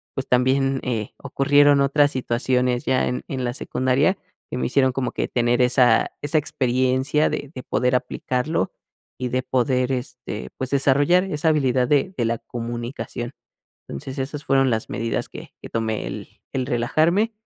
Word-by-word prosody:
pues, 135 - -3
también, 135 +2 +2
eh, 115 -4 -3
ocurrieron 145 +1 +3
otras 145 +1 +3
situaciones 125 -1 0
ya 130 -1 +2
en 125 - -3
en 130 -2 -3
la 120 - -1
secundaria 130 +8 +1 0.3
que - - -3
me - - -1
hicieron 130 0 +3
como 125 -1 -2
que - - -2
tener 120 0 +1
esa 125 0 +4
esa 145 +2 +1
experiencia 130 +2 +1
de 145 - -4
de 130 - -7
poder 125 +1 +1
aplicarlo, 125 - -1 0.5
y 125 - 0
de 130 +1 -1
poder, 125 0 +1
este, 125 -4 -5
pues, 130 - -3
desarrollar 140 +6 +3
esa 160 -3 0
habilidad 130 -5 +2
de 150 +7 +1
de 120 - +1
la 115 0 0
comunicación. 120 +1 -5 0.6
Entonces, 130 - -7
esas 145 +2 -4
fueron 135 -1 +3
las 110 -2 -1
medidas 115 +1 -2
que - - -11
que - - -9
tomé 110 - -2
el - - -6 0.2
el 130 -2 -1
relajarme, 160 - +1
130 Hz, 160 wpm, -22 LUFS, 125-140 Hz, 0.6 s, esa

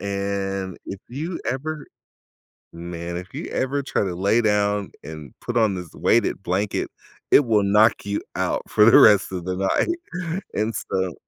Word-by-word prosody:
And 100 -1 -3
if 95 - -7
you 155 +8 -5
ever 150 +3 -4 0.9
man, 85 0 -6
if 90 +1 -8
you - - -5
ever 140 +2 -1
try - - -1
to 95 -3 -3
lay 100 +6 +2
down 105 -2 +1
and 75 -3 -9
put 120 0 -5
on 110 -4 +3
this 90 -3 -8
weighted 115 -3 +1
blanket, 95 +3 -1 0.4
it 140 - +6
will 105 -3 +3
knock 105 +3 +4
you 100 0 -1 0.2
out - - 0
for 105 - +4
the 115 - +8
rest 100 -2 +6
of 90 -2 -4
the 90 0 -2
night, 175 - -2
and 110 +1 -1
so 95 -2 -2
100 Hz, 165 wpm, -23 LUFS, 95-120 Hz, 0.9 s, the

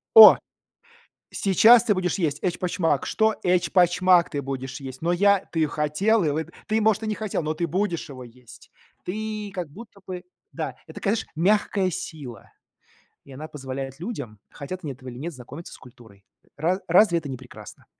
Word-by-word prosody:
О! 220 -1 +12 0.9
Сейчас 220 +5 +5
ты 215 -4 +2
будешь 180 -1 -1
есть 150 -5 0
эчпочмак.- 175 -4 0
Что?- 220 0 +2
Эчпочмак 180 0 +3
ты 145 -2 -3
будешь 135 0 -5
есть. 130 -1 -8
Но 170 +1 +1
я 200 +1 +3
ты 160 -2 +2
хотел 160 +8 +1
и 150 - +2
вы 155 +2 -2 0.2
ты, 220 0 +1
может, 215 0 +2
и - - -3
не 215 - -1
хотел, 210 -5 -3
но 155 0 -2
ты 170 +2 -1
будешь 175 -3 -2
его 130 -2 -9
есть. 120 0 -16 0.3
Ты 215 +1 -4
как 175 -4 -4
будто 210 +4 -13
бы 180 -1 -6 0.3
Да. - - -5
Это, - - -13
такая 205 +1 +1
знаешь, 230 - -4
мягкая 190 +2 +2
сила, 140 -7 -8 0.7
и 140 - -16
она 150 +4 -8
позволяет 135 -2 -7
людям, 145 - -6
хотят 180 +6 -7
они 145 - -4
этого 130 0 -11
или 120 - -10
нет, 165 +5 -5
знакомиться 140 +6 -10
с - - -11
культурой. 115 -6 -17 0.3
Ра 175 +6 0
разве 175 +1 +5
это 160 -3 -4
не 130 - -5
прекрасно? 125 0 -13
170 Hz, 180 wpm, -24 LUFS, 140-200 Hz, 0.9 s, О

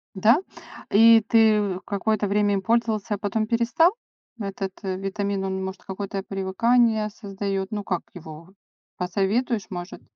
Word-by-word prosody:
Да, 220 +8 +5 0.6
и 225 +1 +7
ты 210 -4 +3
какое-то 205 +1 -1
время 205 0 +2
им 195 - 0
пользовался, 220 -1 0
а - - -7
потом 215 +2 -1
перестал? 240 - +3 0.5
Этот 195 -1 -4
витамин, 195 +1 -2
он, 190 0 -3
может, 190 0 -6
какое-то 195 0 -5
привыкание 215 +3 +1
создаёт. 195 -2 -4
Ну, 205 -1 -3
как 180 -3 -2
его, 165 0 -11 0.5
посоветуешь, 200 +5 -1
может? 175 0 -7
200 Hz, 130 wpm, -24 LUFS, 190-220 Hz, 0.6 s, и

